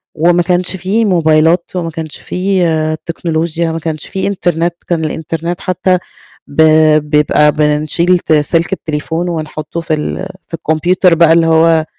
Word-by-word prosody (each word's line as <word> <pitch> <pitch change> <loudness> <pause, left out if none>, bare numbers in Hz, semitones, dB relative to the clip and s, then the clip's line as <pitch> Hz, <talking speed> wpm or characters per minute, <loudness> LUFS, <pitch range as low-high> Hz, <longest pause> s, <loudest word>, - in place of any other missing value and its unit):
وما 175 +2 +2
كانش 180 +1 -1
في 195 +5 0
موبايلات، 165 -2 +2
وما 170 -2 -3
كانش 160 -1 -7
في 170 -4 -1
تكنولوجيا، 165 0 -2
ما 165 - -3
كانش 155 -2 -5
فيه 190 - -3
إنترنت، 175 -3 -1
كان 165 -2 -1
الإنترنت 165 +3 -4
حتّى 185 0 +1 0.5
ب 145 - 0 0.5
بيبقى 150 0 +3
بنشيل 155 +4 +1
ت 160 - 0
سلك 165 +4 +1
التليفون 160 +1 -3
ونحطّه 155 0 -5
في 160 - -2
ال 155 +4 -3 0.2
في - - -25
الكمبيوتر 165 +3 +2
بقى 165 -1 +5
اللي 165 0 +3
هو 160 0 +3
165 Hz, 145 wpm, -13 LUFS, 155-175 Hz, 0.5 s, بقى